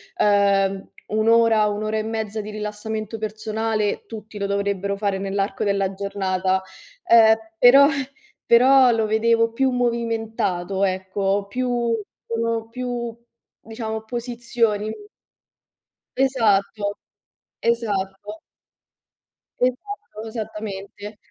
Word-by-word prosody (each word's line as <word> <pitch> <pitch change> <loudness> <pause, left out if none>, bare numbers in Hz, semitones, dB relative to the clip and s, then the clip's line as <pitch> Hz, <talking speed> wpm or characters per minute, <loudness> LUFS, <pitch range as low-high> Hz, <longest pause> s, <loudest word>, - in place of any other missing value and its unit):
ehm, 200 -1 +2 0.2
1 215 +1 0
ora, 230 -2 +5
1 210 0 -1
ora 215 0 -1
e 215 - -1
mezza 220 -1 -3
di 210 - -8
rilassamento 215 +1 -5
personale 215 0 -2
tutti 215 -1 -9
lo 200 - -2
dovrebbero 200 0 -1
fare 200 -1 -1
nell'arco 195 0 -2
della 195 -1 0
giornata, 190 -1 -1 0.4
ehm, 220 -1 +7 0.2
però 275 +5 +8 0.6
però 255 +2 +6
lo 225 -1 +1
vedevo 230 +1 +2
più 265 +3 +1
movimentato, 225 -6 -1
ecco, 195 +1 -1
più 245 0 0 0.3
sono 230 -1 -2
più, 240 -1 -4 0.5
diciamo, 220 -1 -5
posizioni. 235 -2 -1 1.3
Esatto, 210 -6 +1 0.6
esatto. 210 -2 -2 1.2
Esatto, 255 - -3
esattamente. 210 -1 -7
215 Hz, 95 wpm, -22 LUFS, 200-230 Hz, 1.3 s, però